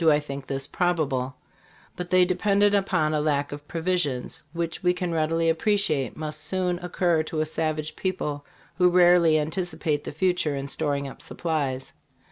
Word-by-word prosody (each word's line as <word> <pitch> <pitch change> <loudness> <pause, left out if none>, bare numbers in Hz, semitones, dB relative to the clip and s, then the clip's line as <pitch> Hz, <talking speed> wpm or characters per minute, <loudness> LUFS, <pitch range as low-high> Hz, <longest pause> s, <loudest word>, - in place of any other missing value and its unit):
I 155 -2 +5
think 140 -2 -7
this 135 0 -2
probable; 145 -8 0 0.6
but 180 0 -5
they 185 0 +5
depended 200 +2 +2
upon 160 -6 +2
a 150 - +1
lack 145 -2 0
of 145 0 -8
provisions, 165 -7 -1
which 170 -1 -3
we 180 0 +2
can 180 -1 -2
readily 165 +1 +1
appreciate 165 - +1
must 155 -1 -3
soon 180 +2 -1
occur 175 -2 +1
to 155 0 -4
a 155 - +2
savage 155 -1 -2
people 150 -6 -2 0.4
who 180 0 +6
rarely 175 -2 +5
an 150 +1 -1
ticipate 160 -5 -2
the - - -5
future 160 -2 0
in 135 0 -4
storing 140 -1 -1
up 135 - -10
supplies. 140 -6 -3
160 Hz, 165 wpm, -25 LUFS, 150-180 Hz, 0.6 s, who